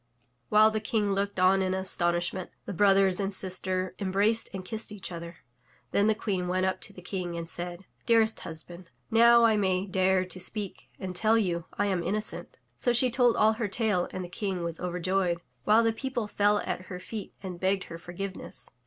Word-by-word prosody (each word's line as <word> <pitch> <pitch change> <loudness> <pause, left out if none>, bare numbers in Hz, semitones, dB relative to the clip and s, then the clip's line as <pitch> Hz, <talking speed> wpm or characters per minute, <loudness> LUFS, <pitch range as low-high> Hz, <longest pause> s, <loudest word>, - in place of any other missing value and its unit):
While 215 +1 +6
the 215 - -1
King 210 -1 0
looked 200 0 -1
on 185 +1 +4
in 185 0 0
astonishment, 175 -1 -1 0.2
the - - -5
brothers 195 0 +4
and 195 0 -1
sister 185 -1 0
embraced 200 +4 +2
and 190 -1 -6
kissed 220 +1 -4
each 205 -3 -7
other. 170 0 -8 0.5
Then 200 +1 +3
the 220 - +3
Queen 190 -5 -2
went 185 +1 +1
up 190 - -1
to - - -3
the 180 -3 -13
King 180 -2 -4
and 165 0 -5
said: 175 +2 -5 0.2
"Dearest 225 -1 +3
husband, 170 +2 -8 0.2
now 235 +1 +6
I 225 -2 +4
may 190 -2 +1
dare 190 -1 +2
to 185 0 -4
speak 205 +1 -3
and 185 -1 -6
tell 220 +4 +4
you 175 -6 -1
I 205 - 0
am 190 -3 0
innocent 210 +5 -4
r' - - -42
So 245 - +2
she 245 +1 +4
told 245 -1 +3
all 215 +1 +5
her 220 -1 -2
tale 205 -3 +1
and 185 - -5
the - - -7
King 185 0 -3
was 170 -1 -3
over 180 0 -3
joyed, 185 0 +1 0.3
while 220 +2 +5
the 225 0 +2
people 250 -1 -3
fell 205 0 +2
at 185 - -4
her 180 -2 -6
feet 205 +2 -7
and 180 -2 -6
begged 190 0 +1
her 165 0 -9
forgiveness. 185 +3 -7
190 Hz, 205 wpm, -28 LUFS, 180-215 Hz, 0.5 s, While